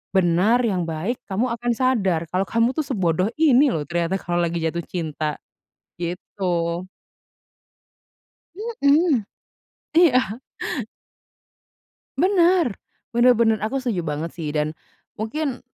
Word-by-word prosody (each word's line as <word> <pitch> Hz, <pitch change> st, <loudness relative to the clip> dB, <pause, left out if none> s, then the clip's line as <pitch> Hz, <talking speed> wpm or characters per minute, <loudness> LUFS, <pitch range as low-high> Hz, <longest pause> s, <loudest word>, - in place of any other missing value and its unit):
benar, 190 Hz, +6 st, +4 dB
yang 185 Hz, -7 st, 0 dB
baik, 170 Hz, +11 st, -3 dB
kamu 220 Hz, +5 st, 0 dB
akan 240 Hz, +1 st, -1 dB
sadar 200 Hz, -10 st, +1 dB
kalau 185 Hz, +1 st, 0 dB
kamu 230 Hz, +2 st, +2 dB
tuh 310 Hz, -, +1 dB
sebodoh 185 Hz, -, +1 dB
ini 290 Hz, -2 st, +5 dB
loh 150 Hz, -, -1 dB
ternyata, 170 Hz, +1 st, 0 dB
kalau 175 Hz, 0 st, -2 dB
lagi 170 Hz, 0 st, -1 dB
jatuh 165 Hz, +1 st, -1 dB
cinta," 155 Hz, -3 st, -3 dB, 0.6 s
gitu. 175 Hz, -1 st, -2 dB, 1.7 s
Mhm. 315 Hz, -, +2 dB, 0.8 s
Iya. 255 Hz, -, +3 dB, 1.8 s
Benar, 355 Hz, -, +4 dB, 0.4 s
benar 240 Hz, 0 st, +5 dB
benar, 225 Hz, -2 st, +3 dB
aku 220 Hz, +6 st, -2 dB
setuju 245 Hz, -8 st, -1 dB
banget 160 Hz, 0 st, -3 dB
sih, 160 Hz, -3 st, -5 dB
dan, 150 Hz, +1 st, -1 dB, 0.5 s
mungkin, 275 Hz, +4 st, -2 dB
205 Hz, 110 wpm, -23 LUFS, 170-255 Hz, 1.8 s, ini